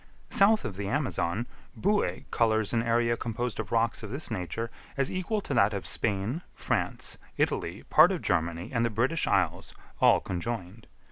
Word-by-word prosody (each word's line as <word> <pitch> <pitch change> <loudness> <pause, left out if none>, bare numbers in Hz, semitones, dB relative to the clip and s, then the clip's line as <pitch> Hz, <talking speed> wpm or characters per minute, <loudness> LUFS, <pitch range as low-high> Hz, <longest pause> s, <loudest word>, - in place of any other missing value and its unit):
South 210 +2 +5
of 95 - -5
the 100 -1 -3
Amazon, 120 - -1 0.3
Boue 205 +2 +1
colours 110 -2 +2
an 115 - +3
area 115 0 +2
composed 120 +1 -3
of 110 -1 -4
rocks 115 0 +1
of 110 - -7
this 135 +3 -4
nature 110 +4 -3 0.3
as 135 -1 +1
equal 185 +4 -1
to - - -4
that 100 +1 +3
of 100 - -4
Spain, 105 - -2
France, - - -2 0.2
Italy, 85 +5 -1
part 160 +5 +6
of 180 - -3
Germany, 85 0 -1
and 115 -1 +2
the 115 - +2
British 125 +9 0
Islands, 90 -2 0 0.2
all - - +6
conjoined. 100 +2 -5
115 Hz, 165 wpm, -28 LUFS, 100-125 Hz, 0.3 s, part